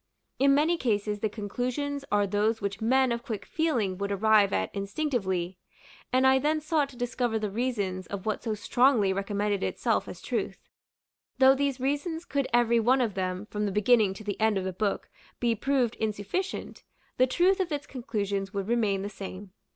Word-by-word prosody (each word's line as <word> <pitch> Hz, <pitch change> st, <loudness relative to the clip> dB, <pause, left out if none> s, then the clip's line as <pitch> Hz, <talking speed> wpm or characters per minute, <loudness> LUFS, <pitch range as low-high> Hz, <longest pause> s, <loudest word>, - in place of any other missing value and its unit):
In 275 Hz, +1 st, +5 dB
many 320 Hz, +4 st, +3 dB
cases, 210 Hz, -5 st, -1 dB
the 215 Hz, -, 0 dB
conclusions 250 Hz, +7 st, -3 dB
are 205 Hz, -1 st, +3 dB
those 210 Hz, +3 st, +1 dB
which 200 Hz, 0 st, -4 dB
men 260 Hz, +3 st, +3 dB
of 235 Hz, 0 st, -1 dB
quick 215 Hz, -4 st, -5 dB
feeling 230 Hz, -, -1 dB
would 200 Hz, 0 st, -2 dB
arrive 210 Hz, 0 st, +4 dB
at 95 Hz, 0 st, -1 dB
instinctively; 195 Hz, -, -2 dB, 0.5 s
and 260 Hz, 0 st, +3 dB
I 265 Hz, 0 st, +5 dB
then 305 Hz, +3 st, +1 dB
sought 305 Hz, -2 st, 0 dB
to 255 Hz, -, -14 dB
discover 245 Hz, -1 st, -1 dB
the 210 Hz, -2 st, -3 dB
reasons 200 Hz, -5 st, -2 dB
of 200 Hz, -2 st, -6 dB
what 215 Hz, -1 st, -1 dB
so 220 Hz, -2 st, -2 dB
strongly 225 Hz, -2 st, +3 dB
recommended 200 Hz, 0 st, -1 dB
itself -, -, 0 dB
as -, -, -8 dB
truth. -, -, -3 dB, 0.8 s
Though 265 Hz, 0 st, +7 dB
these 275 Hz, -1 st, -1 dB
reasons 290 Hz, +5 st, -2 dB
could 275 Hz, -1 st, -1 dB
every 235 Hz, 0 st, +4 dB
one 250 Hz, +4 st, +3 dB
of 235 Hz, -5 st, 0 dB
them, 185 Hz, +1 st, -3 dB
from 210 Hz, 0 st, -1 dB
the -, -, -2 dB
beginning 210 Hz, -1 st, +3 dB
to 215 Hz, -, -9 dB
the 205 Hz, 0 st, -4 dB
end 220 Hz, -2 st, +3 dB
of 190 Hz, -, -1 dB
the 190 Hz, 0 st, -3 dB
book, 200 Hz, +2 st, -1 dB, 0.3 s
be 235 Hz, -1 st, +2 dB
proved 245 Hz, 0 st, +1 dB
insufficient, 220 Hz, -, -3 dB, 0.3 s
the 255 Hz, -, +4 dB
truth 360 Hz, +8 st, +3 dB
of 365 Hz, -3 st, -1 dB
its 285 Hz, -1 st, -3 dB
conclusions 200 Hz, -6 st, -3 dB
would 200 Hz, -2 st, -3 dB
remain 215 Hz, -5 st, +1 dB
the -, -, -3 dB
same. 195 Hz, -1 st, -8 dB
220 Hz, 185 wpm, -28 LUFS, 200-265 Hz, 0.8 s, Though